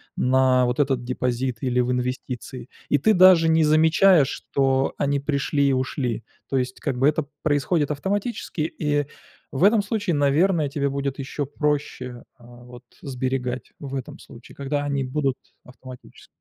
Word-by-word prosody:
на 130 0 +3
вот 125 +3 -2
этот 135 -3 +1
депозит 125 0 -2
или 125 -2 0
в 125 0 +1
инвестиции. 125 0 -4 0.2
И - - +4
ты 215 +10 +3
даже 180 -3 +6
не 160 0 +4
замечаешь, 160 +1 +4
что 135 -1 0
они 140 0 0
пришли 140 0 0
и 135 - +2
ушли. 130 -2 -2 0.3
То 135 - 0
есть, 130 0 -3
как 125 - -3
бы, 135 +3 +3
это 155 0 +1 0.2
происходит 145 +1 +1
автоматически, 195 - -3
и 145 -2 -1 0.5
в 135 - -1
этом 210 +1 +5
случае, 205 -4 -1
наверное, 150 +3 +2
тебе 140 0 -1
будет 140 0 -3
ещё 140 +1 -4
проще, 140 -4 -3 0.2
вот, 120 0 -14 0.2
а, - - -11
сберегать, 130 -1 -3
в 140 -2 -8
этом 130 -3 -6
случае, 115 +1 -14
когда 145 +1 -2
они 140 -1 -1
будут 135 0 -1 0.3
автоматически. 125 0 -14
140 Hz, 155 wpm, -23 LUFS, 130-150 Hz, 0.5 s, даже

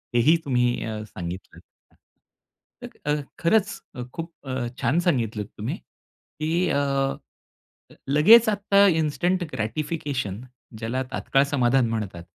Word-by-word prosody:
हे 120 - +5
ही 165 - +6
तुम्ही 125 -2 +1
अ, 110 -1 -4
सांगितलं. 90 -3 -8 1.2
अ, - - -5 0.2
अ, - - +3 0.2
खरंच 205 +4 +1
अ, 125 - -5
खूप 165 +1 -6 0.2
अ, 130 -2 -2
छान 165 +5 +2
सांगितलत 115 -8 0
तुम्ही - - -3
की 165 +4 -4
अ, - - +1 1.1
अ, - - -16
लगेच 215 +11 +7
आता 200 -1 +4
इन्स्टंट 175 +2 +1
ग्रॅटिफिकेशन, 130 - -3 0.4
ज्याला 115 +4 -2
तात्काळ 135 - +2
समाधान 125 -2 +3
म्हणतात. 100 -6 -4
135 Hz, 120 wpm, -24 LUFS, 115-170 Hz, 1.2 s, लगेच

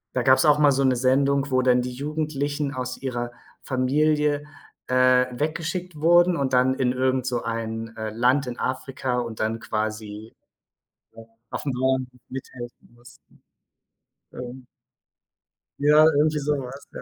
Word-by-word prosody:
Da 125 - +1
gab 130 +1 +6
es - - +2
auch 150 0 +5
mal 145 -2 +5
so 135 +1 +1
'ne 130 -1 +3
Sendung, 140 +2 +2
wo 130 0 +3
dann 125 -1 +3
die 125 0 -4
Jugendlichen 145 +1 -3
aus 125 -1 -4
ihrer 120 -3 -3 0.3
Familie, 145 +3 +1 0.4
äh, 130 0 +4
weggeschickt 165 +6 -3
wurden 175 +2 +5
und 135 -3 -1
dann 130 +1 +3
in 130 -2 0
irgend 130 0 0
so 125 -2 -2
ein, 115 0 -4
äh, 110 0 -4
Land 125 +5 +2
in 125 0 -6
Afrika 130 -1 -2
und 115 -2 -5
dann 110 +1 -1
quasi, 110 -1 -4 0.8
äh, 115 0 -12 0.3
aufm 140 - -3
Bauernhof 130 0 0 0.2
mithelfen 125 -3 -9
mussten. 120 +1 -20 0.9
Ähm 125 +1 -8 1.1
Ja 150 +2 +6
irgendwie 150 0 +2
sowas, 140 -2 -3
ja. - - -7
130 Hz, 145 wpm, -24 LUFS, 125-145 Hz, 1.1 s, gab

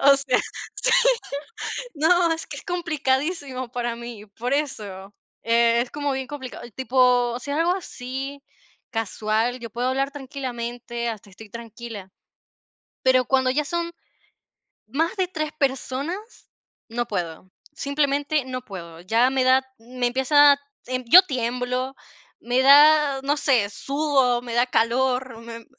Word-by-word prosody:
O 275 0 +7
sea, 270 -2 +1 0.4
sí, - - 0 1.0
no, 335 +2 +3
es 325 - -6
que - - -7
es - - -9
complicadísimo 295 - -1
para 240 -1 -2
mí, 235 -3 -9
por 230 +5 -5
eso. 205 -9 -4 0.3
Es 235 +1 +3
como 290 -1 -2
bien 265 0 -3
complicado, 275 -3 -8
tipo, 250 -2 +3
o 240 - -4
sea, 285 +3 -3
algo 345 +2 +3
así 270 -4 -6 0.5
casual, 225 +2 -1
yo 230 -1 -7
puedo 245 +3 -1
hablar 270 +1 0
tranquilamente 245 -4 -5
hasta 215 -2 -7
estoy 210 +2 -13
tranquila, 230 -4 -8 0.9
pero 255 -1 +4
cuando 260 0 +2
ya 295 +4 +1
son 340 +3 -2 1.0
más 325 +9 -1
de 370 -1 +1
3 310 -4 -3
personas, 280 - -3 0.4
no 240 +1 -2
puedo. 180 -3 -4 0.2
Simplemente 285 0 0
no 255 -1 -4
puedo. 170 -4 -9
Ya 230 +7 +3
me 265 -1 +1
da 260 +1 +5 0.2
me 245 +1 -2
empieza, 285 +3 +5 0.5
yo 350 +11 +10
tiemblo, 250 -2 -2 0.5
me 245 +2 +1
da, 290 0 +7
no 290 +2 0
sé, 245 -9 +2
sudo, 270 0 +1
me 240 -1 -7
da 240 +1 +3
calor, 250 +1 +1
me 230 0 -9
255 Hz, 135 wpm, -24 LUFS, 235-285 Hz, 1.0 s, yo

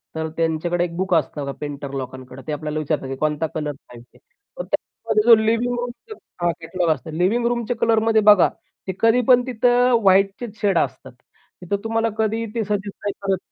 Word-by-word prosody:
तर 160 0 -2
त्यांच्याकडे 165 +2 0
एक 170 -1 -4
बुक 190 -1 -1
असतं 145 -2 -1
पेंटर 145 -1 -5
लोकांकडं. 130 0 -7
ते - - -2
आपल्याला 150 +1 -3
विचारतात, 150 -2 -2
की 135 - -4
"कोणता 155 +2 -1
कलर 150 -1 -2 0.2
पाहिजे." 120 0 -15
तर - - -12
त्याच्यामध्ये 220 -2 -2
जो 230 - +11
लिव्हिंग 230 +2 +1
रूम 245 0 -3 0.5
हां, 175 0 +2
कॅटलॉग 175 +1 -1
असतो. 160 +5 -12
लिव्हिंग 220 +7 +1
रूमचे 240 0 -1
कलरमध्ये 225 -1 +3
बघा, 205 -3 +6 0.4
ते 190 - -2
कधी 230 +2 +4
पण 250 -1 +6
तिथं 245 +1 +3
व्हाईटचेच 195 +3 +2
शेड 195 -4 +2
असतात. 130 - -2 0.5
तिथं 180 +3 -2
तुम्हाला 225 0 0
कधीही 220 +1 0
ते 225 - 0
सजेस्ट 205 0 -3
नाही 205 - 0
करत. 195 -1 0
195 Hz, 180 wpm, -21 LUFS, 155-225 Hz, 0.5 s, जो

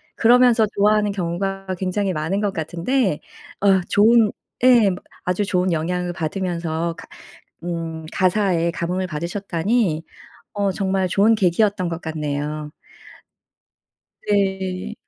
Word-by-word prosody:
그러면서 240 -1 +5
좋아하는 210 0 +3
경우가 195 +1 -3
굉장히 190 +1 -1
많은 160 +5 -1
것 205 -2 -1
같은데 175 - -1 0.4
어 195 -2 +4
좋은 220 +1 +5 0.3
예 240 -5 +6 0.4
아주 180 +3 0
좋은 185 -1 0
영향을 175 +2 -1
받으면서 170 -1 -2
가 - - -11 0.6
음 165 -2 -4
가사에 185 -3 +1
감흥을 180 +2 -2
받으셨다니 170 +2 -1 0.5
어 200 -1 0
정말 190 0 0
좋은 210 +4 +4
계기였던 195 -1 +1
것 165 0 -5
같네요. 150 -1 -4 1.6
네. 190 -1 -1
185 Hz, 245 characters per minute, -21 LUFS, 170-205 Hz, 1.6 s, 예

